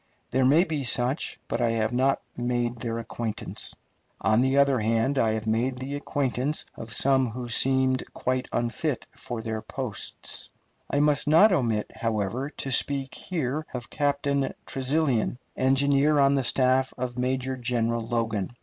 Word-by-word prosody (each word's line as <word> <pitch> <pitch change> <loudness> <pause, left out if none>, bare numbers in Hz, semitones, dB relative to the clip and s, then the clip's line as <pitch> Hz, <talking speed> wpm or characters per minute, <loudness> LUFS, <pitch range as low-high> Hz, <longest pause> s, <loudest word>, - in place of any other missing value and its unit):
There 130 +1 +2
may 150 +7 +6
be 155 -6 -3
such, 125 +3 0
but 115 - -2
I 120 - +3
have 110 +1 0
not 130 +2 +2
made 120 0 -1
their 115 0 -3
acquaintance. 115 -1 -5 0.4
On 110 +2 +3
the 130 +1 +2
other 140 -2 +4
hand, 115 +5 +1
I 110 -3 +2
have 110 0 -3
made 120 +4 0
the 130 +2 -5
acquaintance 145 0 -1
of 115 0 -8
some 130 0 +3
who 120 +2 -6
seemed 130 +2 +1
quite 130 0 -2
unfit 120 +4 -1
for 120 -2 -6
their 110 -1 -3
places. 130 -4 -5 0.4
I 145 - +2
must 150 0 +3
not 165 +8 +7
omit, 115 - 0
however, 115 +4 -2
to 135 -3 -5
speak 135 0 +1
here 155 -3 -3
of 120 0 -6
Captain 140 -1 0
Tresilian, 135 -3 0 0.2
engineer 140 +3 +3
on 140 0 +5
the 135 -1 +1
staff 130 +1 +2
of 125 -1 -4
Major 130 +1 -1
General 115 -2 0
Logan. 115 -2 -2
130 Hz, 155 wpm, -26 LUFS, 115-140 Hz, 0.4 s, not